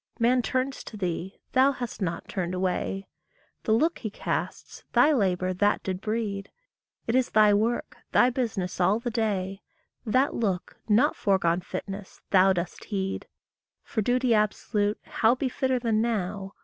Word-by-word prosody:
Man 245 +2 +3
turns 255 +3 -2
to 215 - -8
thee, 180 0 -3
thou 265 +2 +4
hast 245 -4 -6
not 170 -3 -2
turned 185 -1 -3
away; 190 +1 -1 0.6
The - - +1
look 310 +10 +2
he 220 - -4
casts, - - -4
thy 310 - +6
labour 185 -6 +1
that 205 +3 +1
did 185 -1 -3
breed 210 -3 -2 0.6
It 230 - -1
is 255 -1 +2
thy 210 -1 +5
work, 225 +4 0
thy 250 - +5
business 215 -8 -2
all 190 +4 +4
the 240 0 -3
day: 195 -4 -1 0.4
That 255 +4 +2
look, 195 -6 -2
not 245 +9 +4
foregone 185 -3 +2
fitness, 195 +2 -7
thou 190 0 +6
dost 175 -2 -3
heed. 195 -2 -3 0.6
For 220 - -2
duty 245 +2 +2
absolute 210 0 +1
how 230 +2 +2
be 260 0 -1
fitter 260 0 0
than 225 -3 +1
now? 200 -4 -2
210 Hz, 155 wpm, -27 LUFS, 190-240 Hz, 0.6 s, thy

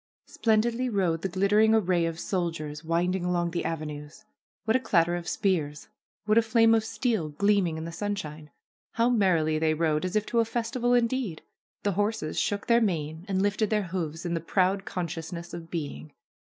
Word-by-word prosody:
Splendidly 230 +3 +1
rode 180 -7 0
the 195 - -2
glittering 210 +4 +3
array 180 -5 +2
of 165 0 -5
soldiers, 165 -5 -3
wind 170 +3 +1
ing 190 - -3
along 175 -1 0
the 170 - -2
avenues. 150 +3 -6 0.4
What 220 +1 +2
a - - +4
clatter 175 -7 +2
of 175 0 -5
spears! 155 -8 -1 0.4
What 215 +2 +5
a - - +4
fiame 225 0 +4
of 220 - +2
steel 220 - -1
gleaming 180 +1 +1
in 160 - -5
the 165 - -5
sunshine! 160 -6 -5 0.4
How 230 +2 +2
merrily 170 -8 +2
they 155 0 +2
rode, 155 -1 +1
as 185 +2 -3
if 215 0 +2
to 235 - 0
a 230 - +3
festival 240 +2 0
indeed! 235 -7 0 0.4
The 205 - +1
horses 205 -4 -1
shook 205 0 -1
their 235 -1 +4
manes 160 -5 -2
and 190 -1 0
lifted 205 +1 +1
their 210 -1 +1
hoofs 165 -2 -4
in 170 - -1
the 165 - 0
proud 190 +3 +1
conscious 165 -1 -4
ness 170 0 -7
of 170 -1 -7
being. 155 -2 -5
180 Hz, 190 wpm, -27 LUFS, 165-215 Hz, 0.4 s, What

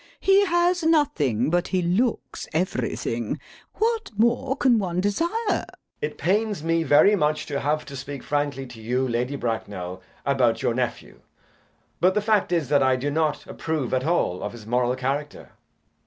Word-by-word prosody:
He 390 +1 +4
has 350 +1 +2
nothing, 155 - +2
but 175 +1 +1
he 185 -2 0
looks 215 +8 -1
everything. 125 - -2 0.4
What 455 0 0
more 235 +4 +2
can 245 -5 +4
one 180 -3 -2
desire? 205 - +1 0.2
JACK. - - -2 0.3
It 455 - -3
pains 205 -2 0
me 165 0 +1
very 160 +6 +5
much 155 -3 0
to 140 -2 -3
have 150 +2 -1
to 140 - -9
speak 135 0 -7
frankly 145 -2 -1
to 120 -3 -12
you, 125 +4 0
Lady 125 +3 -1
Bracknell, 100 -7 -4 0.2
about 130 -4 +2
your - - +2
nephew, 125 0 -3 0.8
but 185 +2 +3
the - - +4
fact 210 -3 +1
is 165 -5 +1
that 145 -1 +4
I 130 -1 +4
do 140 +3 -2
not 155 -1 0
approve 155 -7 -3
at 130 0 +1
all 150 - 0
of 105 - -4
his 115 -3 -11
moral 125 +2 +1
character. 140 +3 -4
150 Hz, 170 wpm, -24 LUFS, 130-200 Hz, 0.8 s, very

